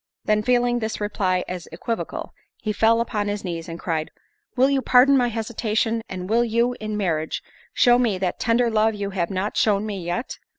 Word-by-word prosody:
Then 215 Hz, 0 st, +2 dB
feeling 245 Hz, +1 st, +2 dB
this 220 Hz, -1 st, -3 dB
reply 190 Hz, -3 st, 0 dB
as 180 Hz, -2 st, -6 dB
equivocal, 225 Hz, +8 st, -4 dB, 0.2 s
he 215 Hz, -, -3 dB
fell 225 Hz, +2 st, +3 dB
upon 210 Hz, -3 st, -2 dB
his 205 Hz, 0 st, -3 dB
knees, 170 Hz, -2 st, -5 dB
and 165 Hz, 0 st, -6 dB
cried, 160 Hz, -2 st, -2 dB, 0.5 s
"Will 260 Hz, +1 st, +4 dB
you 275 Hz, -1 st, +1 dB
pardon 260 Hz, +2 st, +5 dB
my 250 Hz, -2 st, +3 dB
hesitation? 225 Hz, 0 st, -1 dB
and 185 Hz, -1 st, -5 dB
will 230 Hz, +3 st, +3 dB
you, 235 Hz, +2 st, +1 dB
in 215 Hz, -1 st, -3 dB
marriage, 160 Hz, -6 st, -1 dB, 0.3 s
show 245 Hz, -1 st, +4 dB
me 225 Hz, -6 st, +1 dB
that 185 Hz, -1 st, -2 dB
tender 230 Hz, +1 st, +2 dB
love 220 Hz, 0 st, +2 dB
you 200 Hz, -1 st, -4 dB
have 175 Hz, -3 st, -1 dB
not 195 Hz, +2 st, -2 dB
shown 205 Hz, -1 st, +2 dB
me 200 Hz, -4 st, -4 dB
yet? 175 Hz, +9 st, -4 dB
215 Hz, 195 wpm, -23 LUFS, 185-235 Hz, 0.5 s, pardon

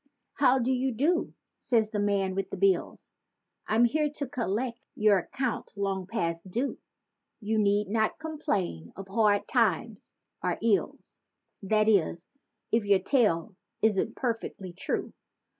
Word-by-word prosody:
"How 265 Hz, -2 st, +4 dB
do 255 Hz, 0 st, +1 dB
you 260 Hz, +1 st, +1 dB
do?" 300 Hz, +9 st, 0 dB, 0.2 s
says 220 Hz, -3 st, +1 dB
the 210 Hz, -, -1 dB
man 200 Hz, -2 st, +1 dB
with 195 Hz, +1 st, -2 dB
the -, -, -5 dB
"bills"— 395 Hz, -1 st, 0 dB, 0.6 s
"I'm 225 Hz, +3 st, +4 dB
here 300 Hz, +5 st, +1 dB
to 290 Hz, 0 st, -5 dB
collect 240 Hz, -1 st, -2 dB, 0.2 s
your 210 Hz, -2 st, +4 dB
account 255 Hz, +4 st, -3 dB
long 195 Hz, -2 st, -2 dB
past 170 Hz, -5 st, -3 dB
due!" 245 Hz, +9 st, -2 dB, 0.6 s
You 220 Hz, 0 st, 0 dB
need 205 Hz, 0 st, +2 dB
not 220 Hz, +1 st, 0 dB
complain 245 Hz, -, -3 dB
of 195 Hz, 0 st, -8 dB
hard 205 Hz, -1 st, +2 dB
times 225 Hz, -2 st, 0 dB, 0.3 s
or -, -, 0 dB
your 220 Hz, -3 st, +3 dB
ills. -, -, -18 dB, 0.4 s
That 215 Hz, +2 st, +2 dB
is, 180 Hz, -4 st, +2 dB, 0.4 s
if 225 Hz, 0 st, +3 dB
your 200 Hz, -1 st, +4 dB
tale 205 Hz, -, +1 dB, 0.3 s
isn't 210 Hz, -3 st, +2 dB
perfectly 225 Hz, -7 st, -4 dB
true. 180 Hz, -, -3 dB
215 Hz, 140 wpm, -28 LUFS, 195-245 Hz, 0.6 s, How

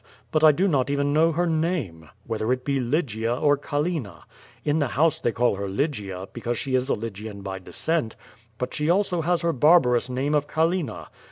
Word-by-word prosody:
But 155 Hz, 0 st, +1 dB
I 155 Hz, -, +9 dB
do 180 Hz, +7 st, +1 dB
not 140 Hz, -7 st, +1 dB
even 140 Hz, 0 st, 0 dB
know 160 Hz, +2 st, +4 dB
her 170 Hz, +3 st, 0 dB
name, 155 Hz, -, -2 dB, 0.2 s
whether 110 Hz, +1 st, -2 dB
it 125 Hz, 0 st, -1 dB
be 140 Hz, -1 st, 0 dB
Lygia 120 Hz, -4 st, -1 dB
or 145 Hz, +2 st, +3 dB
Callina. 145 Hz, -, -3 dB, 0.4 s
In 150 Hz, +1 st, +2 dB
the 145 Hz, -, +1 dB
house 150 Hz, +6 st, +1 dB
they 120 Hz, -, 0 dB
call 120 Hz, -3 st, +1 dB
her 100 Hz, 0 st, -3 dB
Lygia, 100 Hz, -, -3 dB
because 120 Hz, 0 st, -3 dB
she 135 Hz, -3 st, -3 dB
is 130 Hz, +1 st, +1 dB
a -, -, +2 dB
Lygian 105 Hz, -2 st, -7 dB
by 95 Hz, -1 st, -5 dB
descent, 135 Hz, -, -2 dB, 0.4 s
but 125 Hz, -, -4 dB
she 150 Hz, +1 st, -1 dB
also 180 Hz, -1 st, +2 dB
has 175 Hz, +1 st, 0 dB
her 170 Hz, -1 st, +1 dB
barbarous 130 Hz, -4 st, +4 dB
name 135 Hz, +4 st, -1 dB
of 145 Hz, -1 st, +1 dB
Callina. 165 Hz, +1 st, -1 dB
140 Hz, 195 wpm, -24 LUFS, 115-160 Hz, 0.4 s, I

